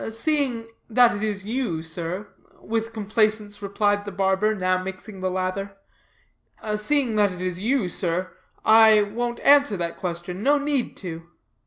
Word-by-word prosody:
"Seeing 245 -1 -1 0.2
that 240 0 +5
it 205 - -5
is 205 -3 -2
you, 215 -8 -2
sir," 170 +5 -5 0.3
with 225 0 -3
complaisance 215 -1 0
replied 205 0 0
the 205 - -6
barber, 195 +3 +1
now 185 -1 0
mixing 190 +2 -8
the 185 0 -1
lather, 190 +2 -3 1.0
"seeing 235 +1 +1
that 205 -2 +3
it 180 - -8
is 180 -1 -2
you 235 0 +1
sir, 180 +1 -2 0.3
I 220 -1 +7
won't 235 +4 -3
answer 285 -7 +5
that 170 -1 -4
question. 180 +1 -5
No 285 +5 +4
need 285 -3 -1
to." 165 -2 -8
205 Hz, 150 wpm, -24 LUFS, 185-225 Hz, 1.0 s, I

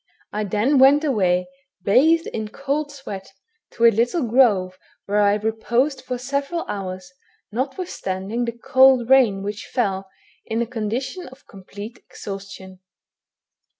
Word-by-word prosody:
I 210 0 -1
then 220 +8 +2
went 280 +3 +6
away, 185 - +1 0.4
bathed 315 - +4
in 220 -1 -4
a - - -14
cold 285 +4 -3
sweat, 200 -10 -9 0.4
to 235 - +2
a 230 - +8
little 240 - +1
grove, 205 -7 +3 0.3
where 205 +1 +1
I 205 0 +4
reposed 235 +6 0
for 250 - -4
several 280 +6 -3
hours, 185 -2 -6 0.4
notwithstanding 235 - -3
the 235 - -3
cold 260 0 +4
rain 225 -8 +5
which 205 +1 -5
fell, 195 -6 -1 0.3
in 225 - -3
a 235 - +1
condition 240 - -4
of 260 +2 -16
complete 205 +4 -10
exhaustion. 195 -2 -9
230 Hz, 135 wpm, -22 LUFS, 200-265 Hz, 0.4 s, a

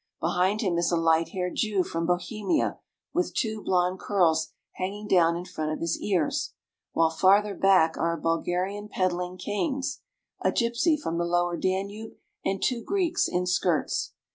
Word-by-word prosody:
Behind 190 +4 +1
him 180 -6 +1
is 170 0 +1
a 170 - +2
light 165 0 +3
haired 180 -1 -3
Jew 210 -4 +1
from 165 -1 -3
Bohemia, 210 - 0 0.3
with 355 -1 -1
two 220 -3 -1
blond 180 0 +1
curls 165 -6 +2 0.3
hanging 205 +3 -4
down 170 -3 +4
in 175 +1 -5
front 155 -4 -3
of 155 - -3
his 165 0 -1
ears, 210 - 0 0.4
while 165 -1 +2
farther 200 +5 +4
back 185 -5 +3
are 170 - +1
a - - -11
Bulgarian 180 +5 -1
peddling 180 -1 -1
canes, 265 - -2 0.4
a - - +3
gypsy 240 +7 +1
from 170 - -3
the - - +1
lower 175 0 +1
Danube, 200 +5 -3 0.3
and 195 0 -1
two 240 -3 0
Greeks 365 -4 +1
in 180 0 -1
skirts. 180 -2 0
185 Hz, 165 wpm, -27 LUFS, 170-210 Hz, 0.4 s, down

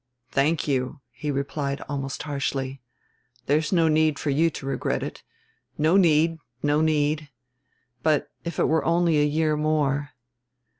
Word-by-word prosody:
"Thank 150 +4 +1
you," 135 +1 -1
he 150 - -5
replied 140 0 -2
almost 135 -1 -4
harshly. 135 -2 -3 0.6
"There's 150 +2 +1
no 170 -3 +4
need 155 -1 +3
for 145 - -1
you 160 +4 +3
to 140 - -8
regret 135 - -1
it. - - -6 0.6
No 155 +4 +3
need, 165 -3 +4 0.2
no 145 +1 +2
need. 155 -1 +1 0.7
But 155 -2 +1
if 170 -1 -5
it - - +3
were 160 0 +2
only 170 -2 +3
a - - +4
year 155 +1 +1
more 145 -2 0
150 Hz, 145 wpm, -25 LUFS, 140-160 Hz, 0.7 s, no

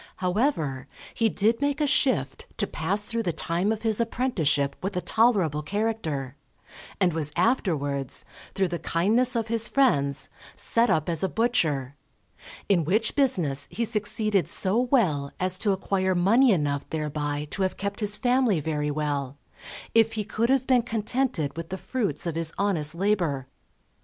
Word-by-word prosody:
However, 180 - -1 0.3
he 225 -1 +2
did 220 +5 +1
make 285 +1 0
a 300 - +2
shift 250 - 0
to - - +1
pass 190 +7 -1
through 230 +2 -2
the 180 -6 -1
time 175 +5 -1
of 220 0 -3
his 220 0 +1
apprenticeship 165 - 0
with 195 0 -3
a - - 0
tolerable 195 -11 +2
character, 160 - -2 0.6
and 180 -4 +2
was 155 -2 -2
afterwards, 145 - 0 0.3
through 190 -2 +1
the 170 0 -3
kindness 225 +9 +2
of 230 -1 -1
his 230 0 +2
friends, 140 - +2 0.3
set 235 +1 +1
up 155 -1 +1
as 165 -3 -1
a 190 - +1
butcher; 155 - 0 0.7
in 180 -5 +3
which 210 +8 +1
business 170 - +1
he 235 - -1
succeeded 215 -2 +1
so 195 +4 +1
well 190 - +1
as 185 0 -1
to 205 - +2
acquire 190 -1 0
money 225 +9 +4
enough 145 -6 -1
thereby 150 -1 -3
to 195 - -3
have 190 -1 0
kept 200 0 -4
his 210 -1 +1
family 245 -7 +2
very 150 -1 -2
well, 145 -2 -2 0.6
if 225 0 +4
he 215 -1 -1
could 220 +3 -1
have 265 -1 +2
been 255 -2 +4
contented 225 - -1
with 165 0 -6
the 190 - -4
fruits 200 - -2
of 170 - -1
his 165 0 -2
honest 165 -6 0
labour. 175 -8 0
190 Hz, 160 wpm, -26 LUFS, 150-225 Hz, 0.7 s, money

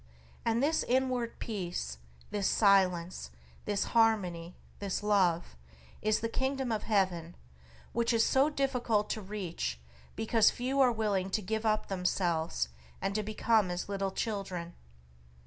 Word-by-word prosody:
And 230 +2 +1
this 315 +3 +2
inward 250 -2 0
peace, 175 - -4 0.3
this 205 -2 0
silence, 185 - +3 0.4
this 205 -1 0
harmony, 185 -7 +2 0.2
this 200 0 -3
Love, 185 - +2 0.5
is 215 0 +1
the 230 - 0
Kingdom 265 +1 -1
of 215 -2 0
Heaven, 185 -6 0 0.6
which 235 0 +1
is 225 -1 +3
so 270 +3 +4
difficult 250 -7 0
to 215 - -3
reach 185 - -4 0.4
because 225 0 +4
few 260 +3 -2
are 255 -2 +6
willing 205 -4 0
to 215 - 0
give 220 +3 -1
up 215 0 +1
themselves 175 - 0 0.3
and 195 - -1
to 215 - 0
become 215 -1 +2
as 175 +2 -4
little 195 -1 -1
children. 190 -5 -3
210 Hz, 135 wpm, -31 LUFS, 180-230 Hz, 0.6 s, are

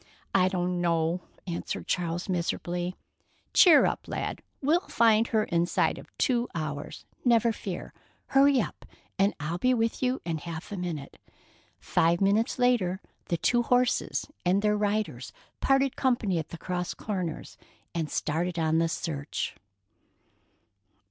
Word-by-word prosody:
"I 185 -1 +4
don't 180 -1 -1
know," 170 0 +1 0.2
answered 170 -2 -4
Charles 175 0 -1
miserably. 175 0 -2 0.6
"Cheer 330 -6 +8
up, - - -2
lad, - - -3 0.2
we'll 320 +6 +1
find 225 -1 +4
her 220 -1 +2
inside 170 -2 +1
of - - -12
two 245 -2 +1
hours, 150 -3 -5 0.2
never 235 -2 +4
fear. 190 -4 -6 0.4
Hurry 275 0 +5
up, - - -4 0.4
and 195 +1 +3
I'll 160 +4 -3
be 255 +4 +3
with 225 -1 0
you 255 +1 +1
in 165 -2 -2
half 165 +3 -7
a - - -3
minute." 170 -6 -5 0.6
Five 170 +1 +2
minutes 200 +3 +2
later, 235 -8 +2 0.3
the 170 - -1
two 240 +7 +2
horses 245 +1 +1 0.2
and 190 +3 +2
their 210 0 +3
riders 205 - -1 0.3
parted 270 -1 +2
company 230 -9 +1
at 160 - -5
the 170 - -7
cross 180 +2 -3
corners, 185 -7 -4 0.4
and 160 -3 -2
started 170 +3 -1
on 160 0 +2
the 165 0 +2
search. 150 -3 -3
180 Hz, 140 wpm, -28 LUFS, 170-230 Hz, 0.6 s, Cheer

